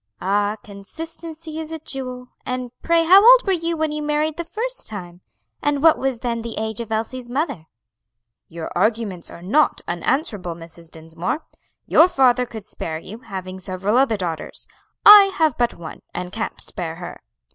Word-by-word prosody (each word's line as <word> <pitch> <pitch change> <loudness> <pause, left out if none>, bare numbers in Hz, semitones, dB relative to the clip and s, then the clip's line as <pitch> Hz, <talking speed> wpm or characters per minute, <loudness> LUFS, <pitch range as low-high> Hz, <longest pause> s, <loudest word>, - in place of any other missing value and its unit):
"Ah, 205 +2 +1
consistency 320 +9 -8
is 320 0 -6
a 320 - -3
jewel! 255 -4 -6
and 250 -1 -4
pray 335 0 +3
how 380 +5 +7
old - - +8
were 390 - +2
you 335 -1 -1
when 315 -1 0
you 300 0 -3
married 300 +1 0
the 340 - -4
first 475 +8 -4
time? 180 -4 -7 0.4
and 290 0 0
what 325 -1 +7
was 260 -3 -1
then 235 -2 -2
the 230 0 -6
age 220 +1 -3
of 225 -1 -8
Elsie's 240 +3 -3
mother?" 265 - -2 0.8
"Your 165 -1 -6
arguments 205 -2 0
are 170 - -11
not 280 +12 +2
unanswerable, 185 - -1
Mrs. 165 0 -12
Dinsmore. 165 - -5 0.4
Your 325 - +6
father 250 -6 +3
could 220 -3 -9
spare 160 -6 -5
you, 200 +7 -10
having 190 -5 -7
several 190 +3 -2
other 255 -4 +3
daughters; 170 -4 -4 0.4
I 415 -1 +11
have 310 -5 +2
but 240 -1 +1
one, 165 -2 -9
and 180 0 -4
can't 225 0 -4
spare 165 -4 -4
her. 175 +1 -9
235 Hz, 170 wpm, -21 LUFS, 185-310 Hz, 0.8 s, I